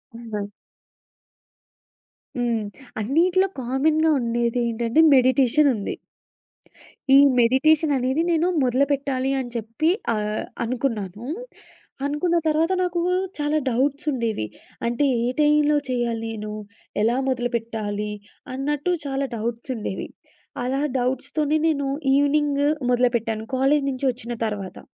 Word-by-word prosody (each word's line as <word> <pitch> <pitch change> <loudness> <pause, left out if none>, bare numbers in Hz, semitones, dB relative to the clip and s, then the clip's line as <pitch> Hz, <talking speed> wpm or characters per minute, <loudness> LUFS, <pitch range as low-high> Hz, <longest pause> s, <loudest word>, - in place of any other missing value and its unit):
హ్మ్. 215 -3 -5 1.9
హ్మ్, 235 -3 0 0.3
అన్నిట్లో 350 - +2
కామన్‌గా 305 +6 +2
ఉండేది 235 0 0
ఏంటంటే 235 +4 0
మెడిటేషన్ 260 +2 +4
ఉంది. 205 - -4 1.2
ఈ - - +10 0.2
మెడిటేషన్ 290 +5 +4
అనేది 260 +4 0
నేను 330 +1 +2 0.2
మొదలుపెట్టాలి 270 +1 +1
అని 250 -2 -4
చెప్పి 230 +8 -1 0.3
ఆహ్, 210 0 -2 0.2
అనుకున్నాను. 230 -4 -3 0.8
అనుకున్న 295 +5 0
తర్వాత 315 +3 +2
నాకు 355 -1 -1 0.4
చాలా 295 +1 0
డౌట్స్ 275 +5 0
ఉండేవి. 230 - -1 0.4
అంటే 240 +5 +1 0.2
ఏ - - +1
టైమ్‌లో 300 0 +4
చేయాలి? 235 -2 -1
నేను 210 -1 -6 0.5
ఎలా 230 +3 +2
మొదలుపెట్టాలి? 225 -4 -2 0.4
అన్నట్టు 290 +5 -1
చాలా 275 0 -1
డౌట్స్ 230 +3 -4
ఉండేవి 210 -4 -4 0.6
అలా 265 +3 -1 0.2
డౌట్స్‌తోనే 280 +4 0
నేను 285 -3 0 0.3
ఈవెనింగ్ 285 0 +2 0.3
మొదలుపెట్టాను, 235 -3 +1
కాలేజీ 275 +2 +2
నుంచి 260 +1 -4
వచ్చిన 240 0 -6
తర్వాత. 205 -3 -5
255 Hz, 105 wpm, -23 LUFS, 230-290 Hz, 1.9 s, ఈ